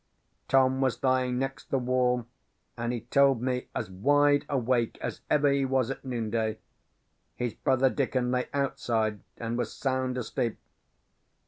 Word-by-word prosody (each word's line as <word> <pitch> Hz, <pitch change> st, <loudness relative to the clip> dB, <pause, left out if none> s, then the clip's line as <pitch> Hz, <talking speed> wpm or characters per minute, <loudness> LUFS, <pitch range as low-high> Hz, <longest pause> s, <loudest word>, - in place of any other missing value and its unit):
"Tom 130 Hz, 0 st, +3 dB
was 130 Hz, -1 st, 0 dB
lying 130 Hz, -1 st, +2 dB
next 135 Hz, +1 st, -4 dB
the 135 Hz, -, +1 dB
wall, 125 Hz, -1 st, +1 dB, 0.5 s
and 115 Hz, 0 st, -2 dB
he 120 Hz, -2 st, -3 dB
told 135 Hz, +2 st, +3 dB
me, 125 Hz, +1 st, -2 dB
as 95 Hz, -, -3 dB
wide 145 Hz, +8 st, +3 dB
awake 125 Hz, -4 st, +1 dB
as -, -, -5 dB
ever 145 Hz, -1 st, +4 dB
he 140 Hz, 0 st, +2 dB
was 130 Hz, -1 st, +1 dB
at -, -, -7 dB
noonday. 110 Hz, -3 st, -2 dB, 0.8 s
His 120 Hz, -3 st, -2 dB
brother 130 Hz, 0 st, +2 dB
Dickon 130 Hz, -3 st, 0 dB
lay 125 Hz, 0 st, 0 dB
outside, 115 Hz, -6 st, 0 dB, 0.2 s
and 115 Hz, +1 st, -3 dB
was -, -, -2 dB
sound 130 Hz, -1 st, -1 dB
asleep. 115 Hz, -1 st, -2 dB
125 Hz, 145 wpm, -28 LUFS, 120-135 Hz, 0.8 s, ever